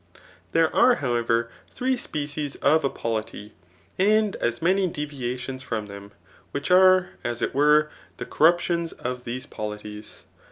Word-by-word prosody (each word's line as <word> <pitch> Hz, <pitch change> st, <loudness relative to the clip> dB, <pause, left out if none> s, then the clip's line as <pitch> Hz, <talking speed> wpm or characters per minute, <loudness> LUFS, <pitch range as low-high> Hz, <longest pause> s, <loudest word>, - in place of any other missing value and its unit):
Thihb 165 Hz, -1 st, +3 dB
are^ 245 Hz, 0 st, +4 dB
howerer, 120 Hz, -2 st, 0 dB, 0.2 s
three 260 Hz, +1 st, -1 dB
species 145 Hz, -, -4 dB
of 160 Hz, +1 st, +2 dB
a 140 Hz, -, +2 dB
polity, 110 Hz, -3 st, -5 dB, 0.5 s
and 210 Hz, +1 st, +3 dB
as 120 Hz, 0 st, -1 dB
many 185 Hz, +3 st, +2 dB
deviations 130 Hz, -4 st, -5 dB
from 110 Hz, -4 st, -4 dB
them, 100 Hz, 0 st, -11 dB, 0.4 s
which 145 Hz, +5 st, -4 dB
are, 185 Hz, 0 st, +6 dB
as 120 Hz, -1 st, -3 dB
it -, -, -1 dB
were^ 150 Hz, +2 st, +4 dB, 0.3 s
tht -, -, -5 dB
ccyruptions 170 Hz, +1 st, +2 dB
of 125 Hz, 0 st, -5 dB
these 125 Hz, +2 st, -5 dB
polities. 105 Hz, 0 st, -8 dB
145 Hz, 135 wpm, -24 LUFS, 120-170 Hz, 0.5 s, are